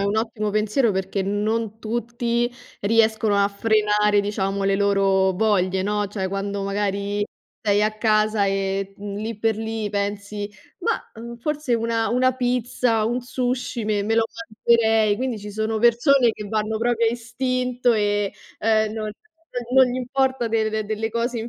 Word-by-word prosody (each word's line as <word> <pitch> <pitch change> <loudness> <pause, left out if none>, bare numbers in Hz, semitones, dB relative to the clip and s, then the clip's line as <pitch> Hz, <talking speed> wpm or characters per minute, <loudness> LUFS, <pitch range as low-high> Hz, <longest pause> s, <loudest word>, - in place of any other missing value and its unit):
è 200 - +1
un 200 +2 0
ottimo 220 -1 -1
pensiero, 215 +3 +2
perché 190 +1 -1
non 215 +2 -1
tutti 235 +1 -1 0.3
riescono 220 0 +2
a 200 0 +4
frenare, 210 0 +2
diciamo, 200 -1 -2
le 195 0 +2
loro 195 -1 +3
voglie, 190 -2 +1
no: 205 +1 0
cioè, 195 -2 -3
quando 200 +1 -3
magari 200 0 -1 0.4
sei 205 -1 +2
a 215 0 +2
casa 215 -1 +2
e 195 0 -1
lì 205 +2 -5
per 225 -1 +1
lì, 220 -1 -3
pensi: 205 0 -3 0.3
"Mah, - - 0 0.2
uhm, 235 0 -7
forse 300 -1 -1
una 230 0 0
una 255 +2 +3
pizza, 245 -2 0
un 240 +3 0
sushi, 245 -2 -2
me 210 -1 0
me 220 +2 0
lo 225 - +4 0.4
mangerei." 225 -2 +4
Quindi 250 -3 -2
ci 205 +1 -8
sono 220 +1 -1
persone 240 +2 +4
che 210 - -8
vanno 220 0 -1
proprio 235 0 +1
a - - +3
istinto 250 +1 0
e, 205 -2 +1 0.3
uhm, 220 -1 +2
non 220 -1 -4 0.5
non 250 +2 +3
non 250 - -2
gli 250 - -2
importa 260 -1 0
de 220 -1 0
delle 215 +1 -2
cose 235 +1 -1
in 225 +2 -4
220 Hz, 160 wpm, -23 LUFS, 205-235 Hz, 0.5 s, a